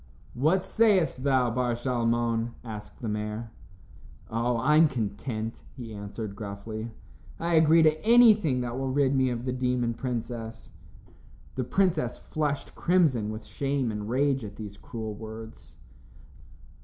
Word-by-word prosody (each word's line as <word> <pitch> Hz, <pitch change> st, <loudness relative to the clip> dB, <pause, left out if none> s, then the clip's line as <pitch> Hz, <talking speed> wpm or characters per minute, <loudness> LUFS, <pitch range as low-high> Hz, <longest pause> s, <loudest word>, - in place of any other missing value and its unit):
"What 160 Hz, +9 st, +2 dB
sayest 195 Hz, -, +2 dB
thou, 130 Hz, -4 st, +3 dB
Bar 120 Hz, 0 st, 0 dB
Shalmon?" 120 Hz, -1 st, 0 dB
asked 105 Hz, 0 st, -9 dB
the -, -, -2 dB
mayor. 105 Hz, +1 st, -3 dB, 0.8 s
"Oh! 115 Hz, +2 st, 0 dB
I'm 150 Hz, +6 st, +5 dB
content," 110 Hz, -2 st, -4 dB, 0.2 s
he 115 Hz, -3 st, -7 dB
answered 100 Hz, 0 st, -6 dB
gruffly. 110 Hz, +2 st, -6 dB, 0.5 s
"I 170 Hz, +1 st, -1 dB
agree 160 Hz, 0 st, +6 dB
to 155 Hz, 0 st, +3 dB
anything 215 Hz, -, +6 dB
that 120 Hz, +1 st, -3 dB
will 135 Hz, 0 st, -1 dB
rid 135 Hz, 0 st, +2 dB
me 130 Hz, -1 st, +3 dB
of 120 Hz, 0 st, -3 dB
the 130 Hz, -, -1 dB
demon 125 Hz, -2 st, 0 dB
princess." 115 Hz, -2 st, -5 dB, 0.8 s
The 130 Hz, -, -2 dB
princess 160 Hz, -4 st, +1 dB
flushed 150 Hz, -2 st, -3 dB
crimson 155 Hz, -, +2 dB
with 110 Hz, 0 st, -6 dB
shame 135 Hz, -1 st, -1 dB
and 105 Hz, 0 st, -5 dB
rage 135 Hz, +1 st, +1 dB
at 100 Hz, -2 st, -7 dB
these 105 Hz, -2 st, -8 dB
cruel 110 Hz, -1 st, -6 dB
words. 110 Hz, +1 st, -10 dB
120 Hz, 135 wpm, -27 LUFS, 110-140 Hz, 0.8 s, agree